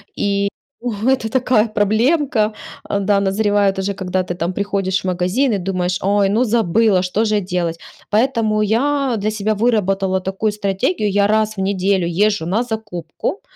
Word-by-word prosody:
и 200 0 0 0.3
О, 240 -2 -2 0.2
это 255 -4 +1
такая 245 -2 +2
проблемка. 220 +2 +1 0.3
А, 200 - -2
да, 200 0 +2
назревает 200 0 +1
уже, 200 +1 -1
когда 185 -1 -1
ты 175 - -5
там 175 +1 -2
приходишь 195 -1 -1
в - - -18
магазин 185 +9 +1
и 205 - +1
думаешь: 180 -1 -1
"Ой, 200 0 +2
ну 220 +5 +2
забыла, 220 -3 +2
что 185 +5 0
же 210 -1 +1
делать?". 175 -3 -2 0.3
Поэтому 220 -2 +1
я 265 +4 +1
для 210 +1 -1
себя 215 0 -1
выработала 195 -4 +1
такую 195 +3 -1
стратегию: 205 - -1
я 200 0 +3
раз 215 0 +1
в - - -5
неделю 190 -2 +1
езжу 200 +1 +1
на 200 +8 0
закупку, 220 - -5
205 Hz, 165 wpm, -18 LUFS, 190-220 Hz, 0.3 s, я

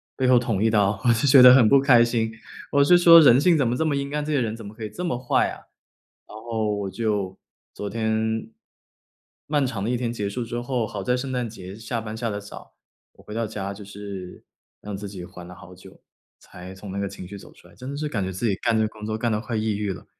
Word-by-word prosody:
背 130 - 0
后 125 -1 +6
捅 110 -4 -1
一 115 - +3
刀”， 100 -2 +1
我 120 - +4
是 115 +5 0
觉 135 -1 +8
得 125 0 +10
很 130 -4 +6
不 140 +5 +6
开 125 -4 +6
心。 115 -2 -1 0.4
我 140 0 +4
是 175 +5 +6
说 170 -1 +9
人 130 -5 +7
性 170 0 +4
怎 135 - +1
么 120 - 0
这 160 - 0
么 145 -2 0
阴 140 +1 -3
暗， 150 0 -1
这 155 - -4
些 145 - +2
人 110 -2 -2
怎 115 -2 -10
么 100 - -9
可 110 - -9
以 105 - -4
这 175 - -7
么 150 -9 -1
坏 125 0 +1
啊， - - -8 0.7
然 105 - -11
后 110 -2 -2
我 100 -1 -4
就 100 -2 -2 0.4
昨 105 - -5
天 110 0 -1 1.0
漫 145 -2 +1
长 110 -6 -4
的 110 - -1
一 125 - 0
天 120 -1 -2
结 105 -3 -3
束 120 +4 -4
之 120 +1 -4
后， 120 -2 -2
好 - - -6
在 125 - +1
圣 130 +1 -4
诞 125 -2 -2
节 95 -3 -10
下 115 +2 -4
班 110 0 -7
下 115 0 -2
得 100 - -4
早， 100 0 -12 0.4
我 - - -20
回 105 - -10
到 115 0 -1
家 100 -2 -5
就 100 +1 -11
是 100 -2 -9 0.4
让 105 -1 -6
自 100 0 -7
己 95 -3 -8
缓 90 -1 -12
了 90 - -11
好 90 +1 -14
久， 95 +1 -16 0.4
才 90 +1 -12
从 95 +1 -9
那 100 - -4
个 100 - -2
情 95 -2 -9
绪 100 +2 -9
走 - - -14
出 - - -20
来， - - -20
真 130 - -9
的 140 - -5
是 150 0 -2
感 105 -9 -2
觉 95 - -3
自 105 +6 -2
己 100 - +1
干 115 +3 0
这 110 - +2
个 - - +1
工 105 0 -10
作 110 0 -3
干 115 +1 -1
得 105 - 0
快 115 +1 -5
抑 110 -1 -1
郁 105 -1 -2
了。 - - -12
110 Hz, 295 characters per minute, -24 LUFS, 100-125 Hz, 1.0 s, 得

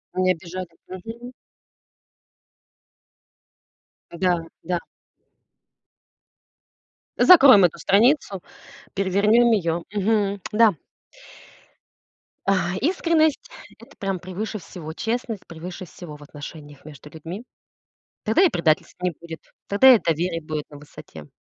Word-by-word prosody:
Не 185 0 +2
обижали, 180 +1 -7 0.2
мгм. 225 +7 -9 2.8
Да-да. 175 0 -2 2.4
Закроем 270 - +8
эту 170 - -1
страницу. 205 - +2 0.5
Перевернём 205 +5 +3
её. 170 -5 0
Мгм, 205 -1 0
да. 220 -3 +4 1.7
А, 190 -2 +1
искренность- 325 - +1 0.3
это - - -17
прям 195 -2 -3
превыше 185 +5 -5
всего, 165 -3 -9
честность- 225 0 -4
превыше 175 +3 -8
всего 160 -3 -11
в 145 - -14
отношениях 145 0 -11
между 150 -1 -13
людьми. 170 +9 -9 0.8
Тогда 220 +10 +2
и 360 - +5
предательств 165 - 0
не 180 -1 0
будет, 165 0 -10 0.3
тогда 250 +5 +7
и - - +1
доверие 165 +1 -1
будет 155 -1 -5
на 145 - -12
высоте. 145 0 -13
185 Hz, 100 wpm, -23 LUFS, 165-220 Hz, 2.8 s, Закроем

